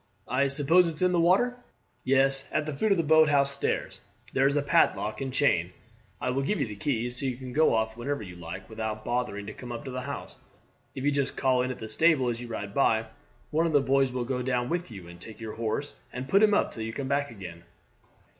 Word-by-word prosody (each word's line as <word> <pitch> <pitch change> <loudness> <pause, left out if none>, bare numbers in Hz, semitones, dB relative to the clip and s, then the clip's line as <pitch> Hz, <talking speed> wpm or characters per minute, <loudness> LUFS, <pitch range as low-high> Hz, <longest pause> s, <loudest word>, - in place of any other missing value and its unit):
I 135 +3 +2
suppose 150 +6 +4
it's 165 +1 -2
in 180 - +4
the 175 - +2
water?" 200 +9 +3 0.5
"Yes; 135 +1 +3
at 155 0 0
the 155 - -3
foot 215 +11 0
of 195 - +4
the 165 - +1
boathouse 150 -3 +4
stairs. 140 - -2 0.3
There 135 0 +4
is 140 - +1
a 145 - +1
padlock 110 -5 +2
and 135 -1 -3
chain. 90 -11 +2 0.5
I 125 - -1
will 135 +2 0
give 175 +8 -1
you - - +1
the 105 -2 -7
key, 120 +2 -1
so 125 +3 -2
you 130 - -2
can 130 -1 -8
go 155 -4 +4
off 110 0 0
whenever 130 +1 -3
you 90 -3 -9
like 85 +2 -8
without 110 -1 -5
bothering 120 -4 -2
to 105 - -7
come 125 -1 -9
up 120 +5 -6
to 130 - -5
the 130 0 -4
house. 140 +1 -6 0.6
If 130 - -5
you 145 - +3
just 140 -1 -1
call 130 -2 +2
in 130 - -1
at 130 - -4
the 110 - -7
stable 135 +2 +3
as 120 0 -3
you 120 - -7
ride 105 -3 -5
by, 115 -4 +2 0.5
one 160 +2 +2
of 160 - -2
the 145 - +6
boys 135 -1 +2
will 125 -1 -2
go 125 0 -2
down 125 -1 -1
with 175 -2 -2
you 95 -6 -10
and 85 0 -13
take 110 +4 -10
your 110 -1 -6
horse 115 +6 -3 0.2
and 125 +1 -6
put 195 +8 +4
him 210 -1 +5
up - - +1
till 115 - -6
you 110 0 -4
come 135 +3 -4
back 140 +1 0
again." 90 -6 -10
130 Hz, 250 wpm, -28 LUFS, 115-145 Hz, 0.6 s, the